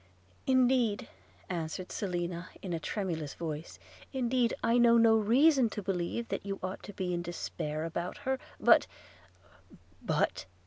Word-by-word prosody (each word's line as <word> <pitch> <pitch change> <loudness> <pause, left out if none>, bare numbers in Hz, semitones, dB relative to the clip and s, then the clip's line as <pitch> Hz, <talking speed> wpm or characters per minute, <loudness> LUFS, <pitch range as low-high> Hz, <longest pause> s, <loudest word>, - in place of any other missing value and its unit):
'Indeed,' 255 -4 +3 0.4
answered 175 +1 -4
Selina 175 -2 -3
in 185 -3 -3
a 165 - -1
tremulous 160 -4 -3
voice 160 -1 -5 0.2
– - - -21
'indeed 245 -2 +1
I 230 +1 +4
know 235 -1 +6
no 225 -1 +6
reason 250 +4 +4
to 210 -1 -5
believe 190 +5 -2
that - - -3
you 195 0 -3
ought 185 +1 -4
to - - -7
be 185 -2 -2
in 175 - -1
despair 160 -3 -4
about 170 +2 -4
her, 265 0 0 0.2
but - - +6 0.4
– 90 0 -29 0.2
' - - -23
'But!' - - 0
190 Hz, 155 wpm, -31 LUFS, 170-235 Hz, 0.4 s, know